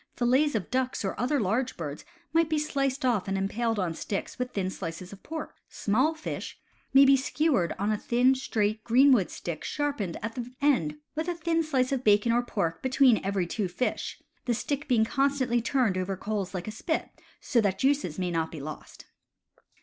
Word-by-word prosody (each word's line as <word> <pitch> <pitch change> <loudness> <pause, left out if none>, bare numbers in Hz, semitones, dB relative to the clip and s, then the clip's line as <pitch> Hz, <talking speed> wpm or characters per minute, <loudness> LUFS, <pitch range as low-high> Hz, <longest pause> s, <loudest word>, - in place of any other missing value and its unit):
Fillets 260 +4 +2
of 210 - -3
ducks 255 -4 -1
or 190 - -1
other 260 +5 +1
large 230 +5 0
birds 150 -3 -5 0.3
may 330 0 +5
be 315 -1 -1
sliced 275 -2 -1
off 230 -7 +1
and 195 0 -1
impaled 225 +4 -1
on 180 -4 -1
sticks 195 +8 -4
with 250 0 -1
thin 190 -5 -2
slices 180 +1 -6
of 200 - -13
pork. 315 0 -6 0.2
Small 260 +10 +1
fish 315 - -6 0.3
may 275 +1 +8
be 275 0 +7
skewered 265 - +1
on 205 +2 0
a 210 - 0
thin, 245 +3 +3
straight, 215 -4 -1
greenwood 250 -4 +5
stick, 170 -3 -6
sharpened 280 - -2
at 225 0 -3
the 245 0 -6
end, 240 - +2 0.2
with 315 +2 -3
a 350 - -1
thin 330 0 0
slice 270 -5 0
of 265 -2 -1
bacon 210 +1 +4
or 240 +1 +3
pork 200 -9 -2
between 260 -2 +4
every 195 -2 0
two 195 +3 -2
fish, 180 +8 -3 0.3
the 240 - +1
stick 285 +5 -3
being 235 -4 +3
constantly 270 -2 +1
turned 230 -4 +1
over 185 +1 -1
the - - -18
coals 200 -3 -3
like 180 +1 -4
a - - -3
spit, 315 +9 -2 0.3
so 235 - +2
that 195 -3 0
juices 270 - +1
may 180 -1 -1
not 165 -1 -1
be 160 - -7
lost. 150 +2 -9
235 Hz, 195 wpm, -28 LUFS, 195-275 Hz, 0.3 s, may